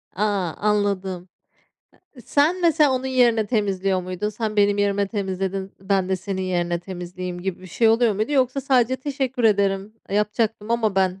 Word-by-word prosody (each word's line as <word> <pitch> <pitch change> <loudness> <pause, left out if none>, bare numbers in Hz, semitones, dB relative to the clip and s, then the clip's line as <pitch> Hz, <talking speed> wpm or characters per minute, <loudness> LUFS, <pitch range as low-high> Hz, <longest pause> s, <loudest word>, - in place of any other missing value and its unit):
A! 205 - 0 0.3
Anladım. 195 -3 -1 0.9
Eee, - - -11
sen 305 - +2
mesela 310 -4 +4
onun 260 +1 -1
yerine 240 -4 +3
temizliyor 195 -4 0
muydun? 185 +3 -3
"Sen 215 0 -4
benim 205 0 +3
yerime 200 0 +1
temizledin, 195 -1 -3
ben 195 -1 0
de 190 - +1
senin 190 0 -4
yerine 175 -2 -1
temizleyeyim," 180 0 -6
gibi 190 -1 -3
bir - - -10
şey 225 +5 +2
oluyor 225 -1 +4
muydu 215 +8 -2
yoksa 265 0 +2
sadece 260 -1 +2
"Teşekkür 265 -3 -3
ederim, 200 -1 +2 0.2
eee, 200 - 0
yapacaktım 210 +1 -1
ama 225 -3 +1
ben," 190 0 +1
205 Hz, 165 wpm, -23 LUFS, 190-235 Hz, 0.9 s, mesela